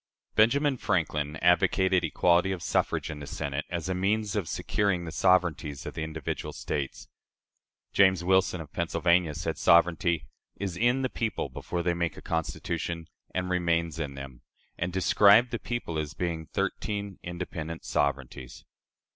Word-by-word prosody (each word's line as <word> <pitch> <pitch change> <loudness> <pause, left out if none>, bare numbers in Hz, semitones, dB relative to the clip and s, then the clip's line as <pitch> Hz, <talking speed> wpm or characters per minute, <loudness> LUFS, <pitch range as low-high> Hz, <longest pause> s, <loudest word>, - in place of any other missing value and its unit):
Benjamin 135 +5 +3
Franklin 75 -8 -1
advocated 90 +1 +4
equality 85 +3 +3
of 90 -3 -4
suffrage - - 0
in 75 - -7
the 70 - -8
Senate 70 0 -3
as 85 -1 -3
a 95 - 0
means 100 +2 0
of 100 -6 -1
securing 95 -4 0
"the 80 - -5
sovereignties 85 -5 +1
of - - -5
the - - -5
individual 80 0 -4
States." 70 -3 -4 0.9
James 95 -3 +4
Wilson, 95 -1 +2
of 75 -2 -11
Pennsylvania, 85 -1 +1
said 80 +1 -3
sovereignty 85 -2 +3 0.3
"is 95 -3 -3
in 120 +7 +2
the 130 - 0
people 110 -7 -2
before 85 -1 -4
they 85 0 +1
make 85 -1 -2
a - - -9
Constitution, 80 0 -3 0.3
and 90 0 -1
remains 85 -2 0
in 70 -3 -3
them," 70 -2 -9 0.3
and 85 +1 -2
described 100 +5 +5
the 120 - -2
people 120 -10 -3
as 75 -2 -4
being 85 -3 -3
"thirteen 100 +5 -3
independent 85 -2 -6
sovereignties." 70 -3 -2
85 Hz, 150 wpm, -28 LUFS, 80-95 Hz, 0.9 s, described